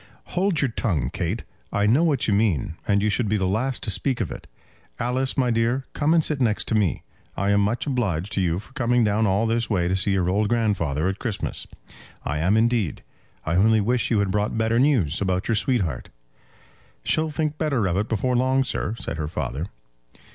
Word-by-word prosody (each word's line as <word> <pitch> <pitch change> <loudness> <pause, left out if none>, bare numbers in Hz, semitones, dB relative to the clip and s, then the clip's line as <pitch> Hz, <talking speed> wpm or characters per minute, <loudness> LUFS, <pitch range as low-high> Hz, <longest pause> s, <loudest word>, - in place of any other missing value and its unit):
"Hold 180 -2 +1
your 130 - 0
tongue, 75 - -1
Kate. - - -2 0.3
I 100 0 +1
know 125 +10 +4
what 150 -6 +1
you 105 - +2
mean, 100 - +1
and 100 -1 +2
you 105 - +2
should 110 0 0
be 105 - +2
the 95 - 0
last 120 +8 -1
to 105 - +1
speak 130 +4 0
of 100 - -2
it. - - -9 0.5
Alice, 130 +3 -1
my 125 -2 +2
dear, 115 +3 +1
come 155 +2 +2
and 160 - +3
sit 150 -3 0
next 110 -4 +1
to - - 0
me. 100 -6 +1 0.3
I 100 +1 +1
am 100 0 +4
much 105 +4 0
obliged 105 - -1
to 95 - 0
you 85 -2 +1
for 105 +7 -10
coming 125 -3 +2
down 105 +1 +2
all 100 +4 +2
this 115 +1 0
way 90 -5 +1
to 95 - +1
see 95 +1 0
your 95 -2 +1
old 100 +3 +1
grandfather 95 -10 0
at 95 +1 -2
Christmas. 115 -5 -4 0.6
I 75 +2 -1
am 95 +7 +2
indeed. 115 -6 +1 0.4
I 80 - -1
only 110 +3 +4
wish 120 +4 0
you 115 - +2
had 100 -2 +1
brought 105 +2 0
better 110 +1 +2
news 120 - +2
about 95 0 0
your 115 - +1
sweetheart." 105 - 0 0.9
"She'll 155 0 +1
think 155 0 -2
better 140 -9 +1
of 90 -2 0
it 105 +3 -1
before 125 +3 0
long, 130 +2 +2
sir," 115 -3 -2
said - - -4
her 75 -1 -2
father. 75 +1 -3
110 Hz, 210 wpm, -24 LUFS, 95-125 Hz, 0.9 s, know